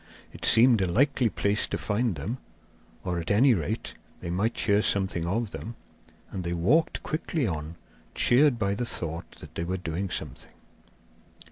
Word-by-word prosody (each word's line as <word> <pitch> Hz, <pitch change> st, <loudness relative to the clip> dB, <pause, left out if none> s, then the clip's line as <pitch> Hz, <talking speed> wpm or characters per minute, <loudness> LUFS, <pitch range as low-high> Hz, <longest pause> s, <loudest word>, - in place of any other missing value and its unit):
It -, -, -6 dB
seemed 115 Hz, -2 st, +6 dB
a 90 Hz, -2 st, 0 dB
likely 130 Hz, +2 st, +3 dB
place 100 Hz, +1 st, +1 dB
to -, -, -2 dB
find 110 Hz, -1 st, -1 dB
them, 110 Hz, -, -4 dB, 0.6 s
or, 90 Hz, -1 st, -2 dB
at 85 Hz, -, -5 dB
any 125 Hz, +6 st, +5 dB
rate, 80 Hz, -9 st, -3 dB, 0.3 s
they 85 Hz, -, -5 dB
might 105 Hz, +6 st, 0 dB
hear 100 Hz, 0 st, +3 dB
something 95 Hz, -5 st, +1 dB
of 110 Hz, +3 st, -1 dB
them, 115 Hz, +1 st, -7 dB, 0.6 s
and 95 Hz, -, -4 dB
they 85 Hz, 0 st, -2 dB
walked 120 Hz, -, +2 dB
quickly 155 Hz, -2 st, -1 dB
on, 80 Hz, -4 st, -4 dB, 0.4 s
cheered 130 Hz, +1 st, +4 dB
by 100 Hz, -3 st, 0 dB
the 115 Hz, +5 st, -2 dB
thought 85 Hz, -5 st, -5 dB
that -, -, -12 dB
they 85 Hz, -, -3 dB
were 90 Hz, +2 st, -2 dB
doing 90 Hz, +2 st, -3 dB
something. 75 Hz, -7 st, -5 dB
100 Hz, 165 wpm, -27 LUFS, 85-120 Hz, 0.6 s, seemed